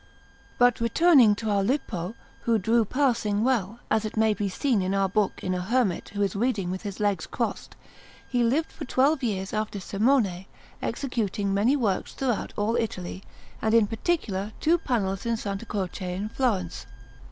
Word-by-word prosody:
But 245 -1 +4
returning 240 -2 +5
to 215 0 -2
our 200 -1 +2
Lippo, 200 - -2 0.3
who 230 -1 +3
drew 225 +3 +2
passing 230 -5 +1
well, 235 -3 0
as 220 0 +3
it 215 0 -5
may 220 0 +4
be 205 -1 -2
seen 230 +2 +1
in 185 +1 0
our 195 0 +2
book 200 +1 0
in 185 - -1
a 180 - -1
hermit 215 -2 0
who 205 0 -1
is 195 -1 -1
reading 205 -5 0
with 185 - -4
his 200 -3 -6
legs 205 -2 0
crossed; - - -3 0.5
he 245 -2 +1
lived 280 +8 +1
for - - -7
twelve 275 +4 +2
years 195 -5 -2
after 215 -1 -2
Simone, 200 -2 +1 0.4
executing 205 -7 -2
many 215 +8 +3
works 215 -9 -1
throughout 250 -5 -1
all 215 +3 +1
Italy, 190 -5 -3 0.4
and 220 +1 +2
in 230 -2 +6
particular 215 - -2
two 340 +2 +3
panels 195 - -1
in 235 - +1
S. 225 - -4 0.2
Croce 185 -2 -3
in 205 +3 -3
Florence. 210 -9 -1
215 Hz, 175 wpm, -26 LUFS, 195-240 Hz, 0.5 s, in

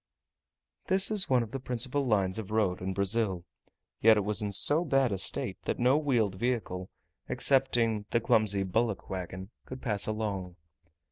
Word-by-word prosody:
This 190 +2 +4
is 205 -3 +1
one 125 -2 +3
of 110 - -9
the 135 - -4
principal 130 +2 -1
lines 100 -3 +1
of 105 - -7
road 105 -5 0
in 95 +1 -3
Brazil; 100 -2 0 0.6
yet 110 0 +6
it 105 - +1
was 105 -1 -1
in 105 -1 -2
so 145 - +4
bad 135 -6 +1
a 100 - -1
state - - -2
that - - -1
no 125 +3 +3
wheeled 125 -10 +1
vehicle, 105 -7 -2 0.4
excepting 120 -6 +1
the 115 - +1
clumsy 105 -3 +2
bullock 110 +2 -2
wagon, 95 +2 -6 0.2
could 130 - -8
pass 105 -5 0
along. 100 -5 -3
110 Hz, 165 wpm, -29 LUFS, 100-125 Hz, 0.6 s, yet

